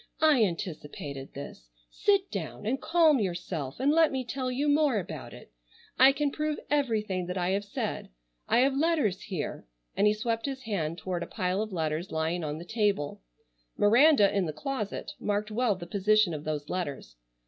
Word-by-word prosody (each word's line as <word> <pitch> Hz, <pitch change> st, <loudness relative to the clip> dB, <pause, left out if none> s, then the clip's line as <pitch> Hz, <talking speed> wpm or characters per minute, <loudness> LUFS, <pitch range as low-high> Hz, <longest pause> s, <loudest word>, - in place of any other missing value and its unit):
I 305 Hz, -7 st, +5 dB
anticipated 150 Hz, -7 st, -5 dB
this. -, -, -9 dB, 0.2 s
Sit 400 Hz, -1 st, +2 dB
down 155 Hz, -, -5 dB
and 255 Hz, +5 st, -1 dB
calm 320 Hz, -4 st, +4 dB
yourself 175 Hz, -, -3 dB
and 275 Hz, +3 st, +3 dB
let 320 Hz, 0 st, +4 dB
me 265 Hz, -1 st, -2 dB
tell 255 Hz, +2 st, -3 dB
you 275 Hz, +4 st, -1 dB
more 290 Hz, -4 st, +3 dB
about 160 Hz, -7 st, -5 dB
it. -, -, -13 dB, 0.5 s
I 260 Hz, +2 st, +9 dB
can 285 Hz, +1 st, -1 dB
prove 305 Hz, 0 st, -2 dB
everything 215 Hz, -10 st, 0 dB
that 180 Hz, +1 st, -3 dB
I 180 Hz, 0 st, 0 dB
have 200 Hz, +2 st, 0 dB
said. 200 Hz, -, -4 dB, 0.4 s
I 240 Hz, -, +5 dB
have 270 Hz, +1 st, +3 dB
letters 290 Hz, -, +1 dB
here——" 180 Hz, -, -5 dB, 0.3 s
and 210 Hz, -, +3 dB
he 210 Hz, -, +4 dB
swept 225 Hz, +3 st, -2 dB
his 265 Hz, -1 st, -5 dB
hand 170 Hz, -8 st, -2 dB
toward 175 Hz, +1 st, -3 dB
a -, -, -4 dB
pile 185 Hz, +2 st, -1 dB
of 215 Hz, -1 st, -4 dB
letters 160 Hz, 0 st, -2 dB
lying 160 Hz, +2 st, -1 dB
on 150 Hz, 0 st, -3 dB
the 170 Hz, -, -8 dB
table; 205 Hz, -8 st, 0 dB, 0.6 s
Miranda 235 Hz, 0 st, +5 dB
in 190 Hz, -3 st, +1 dB
the 155 Hz, -, -3 dB
closet 260 Hz, -, -4 dB
marked 210 Hz, -1 st, -1 dB
well 225 Hz, -1 st, +1 dB
the 175 Hz, -2 st, -8 dB
position 200 Hz, 0 st, +2 dB
of 150 Hz, -1 st, -6 dB
those 150 Hz, -1 st, -3 dB
letters. 145 Hz, -, -4 dB
205 Hz, 180 wpm, -29 LUFS, 170-265 Hz, 0.6 s, I